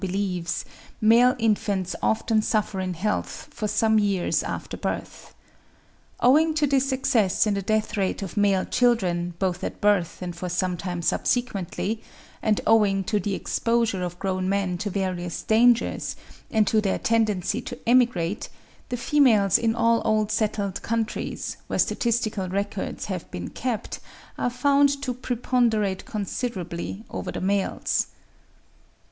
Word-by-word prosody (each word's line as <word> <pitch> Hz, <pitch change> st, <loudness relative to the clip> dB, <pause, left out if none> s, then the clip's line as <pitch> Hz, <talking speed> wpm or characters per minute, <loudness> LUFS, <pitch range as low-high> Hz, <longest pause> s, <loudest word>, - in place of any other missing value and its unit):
believes, 185 Hz, -3 st, -2 dB, 0.3 s
male 235 Hz, +4 st, +5 dB
infants 205 Hz, -4 st, 0 dB
often 220 Hz, 0 st, +2 dB
suffer 210 Hz, -3 st, 0 dB
in 185 Hz, -1 st, -2 dB
health 210 Hz, +5 st, -3 dB
for 215 Hz, -, -3 dB
some 220 Hz, +1 st, +3 dB
years 200 Hz, -4 st, +1 dB
after -, -, -5 dB
birth. -, -, -5 dB, 0.8 s
Owing 310 Hz, +5 st, +4 dB
to 305 Hz, -1 st, +3 dB
this 270 Hz, -1 st, +1 dB
excess 255 Hz, -9 st, +2 dB
in 210 Hz, -, +1 dB
the 200 Hz, -, -1 dB
death 215 Hz, +2 st, 0 dB
rate 195 Hz, 0 st, -1 dB
of 190 Hz, -, -7 dB
male 200 Hz, -2 st, +2 dB
children, 180 Hz, -8 st, +1 dB
both 185 Hz, -1 st, -1 dB
at -, -, -4 dB
birth 200 Hz, -5 st, +2 dB
and 175 Hz, -1 st, -5 dB
for 180 Hz, +1 st, -5 dB
some 180 Hz, +1 st, 0 dB
time 175 Hz, -1 st, -4 dB
subsequently, 220 Hz, 0 st, -1 dB, 0.4 s
and 215 Hz, -2 st, +2 dB
owing 205 Hz, -3 st, +4 dB
to 210 Hz, +2 st, 0 dB
the 200 Hz, -1 st, -2 dB
exposure 230 Hz, -4 st, 0 dB
of 175 Hz, -1 st, -4 dB
grown 185 Hz, 0 st, -1 dB
men 195 Hz, -2 st, 0 dB
to 210 Hz, -, -2 dB
various 180 Hz, -3 st, -3 dB
dangers, 235 Hz, +1 st, +3 dB, 0.3 s
and 220 Hz, -1 st, +3 dB
to 215 Hz, +1 st, +2 dB
their 195 Hz, -2 st, 0 dB
tendency 220 Hz, -1 st, +1 dB
to 245 Hz, -, -7 dB
emigrate, 230 Hz, -6 st, +2 dB, 0.4 s
the 245 Hz, -, -2 dB
females 235 Hz, -, +4 dB
in 225 Hz, -1 st, +1 dB
all 230 Hz, 0 st, +3 dB
old 215 Hz, -1 st, +1 dB
settled 205 Hz, -3 st, -1 dB
countries, 225 Hz, -1 st, -3 dB
where -, -, -2 dB
statistical 220 Hz, -5 st, 0 dB
records 200 Hz, +2 st, -3 dB
have -, -, -5 dB
been -, -, -6 dB
kept, 245 Hz, -4 st, -3 dB, 0.4 s
are -, -, +1 dB
found 280 Hz, +3 st, +3 dB
to 255 Hz, -2 st, -1 dB
preponderate 235 Hz, -5 st, 0 dB
considerably 195 Hz, -2 st, -4 dB
over -, -, -4 dB
the -, -, -4 dB
males. 195 Hz, +1 st, 0 dB
210 Hz, 140 wpm, -25 LUFS, 190-230 Hz, 0.8 s, male